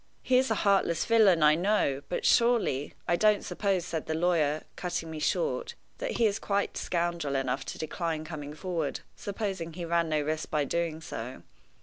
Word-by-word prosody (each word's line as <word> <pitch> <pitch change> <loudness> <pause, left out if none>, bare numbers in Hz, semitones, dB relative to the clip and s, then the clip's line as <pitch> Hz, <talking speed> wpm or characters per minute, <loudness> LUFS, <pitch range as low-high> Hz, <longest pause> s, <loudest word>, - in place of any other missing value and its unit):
He 255 0 +4
is 265 - +1
a 220 - +2
heartless 195 -5 +2
villain, 205 -8 +5
I 150 0 +7
know; 170 -6 +1
but - - -2
surely 235 - +3
" - - -38
"I 175 - +3
don't 210 +3 +3
suppose," 195 -4 0
said 160 -3 -4
the 160 - -1
lawyer, 160 -3 +1
cutting 170 -2 -3
me 155 - -5
short, 485 - -1 0.2
"that - - -2
he 230 - +2
is 205 0 +1
quite 200 0 -1
scoundrel 170 -5 -1
enough 135 0 -1
to - - -6
decline 160 0 -3
coming 150 -2 -7
forward, 165 -3 -3
supposing 195 -5 -4
he 175 +1 -5
ran 170 -1 +1
no 155 -1 +1
risk 155 +1 -2
by 150 -2 +1
doing 165 +1 -2
so. 125 -4 -7
170 Hz, 190 wpm, -29 LUFS, 155-200 Hz, 0.2 s, I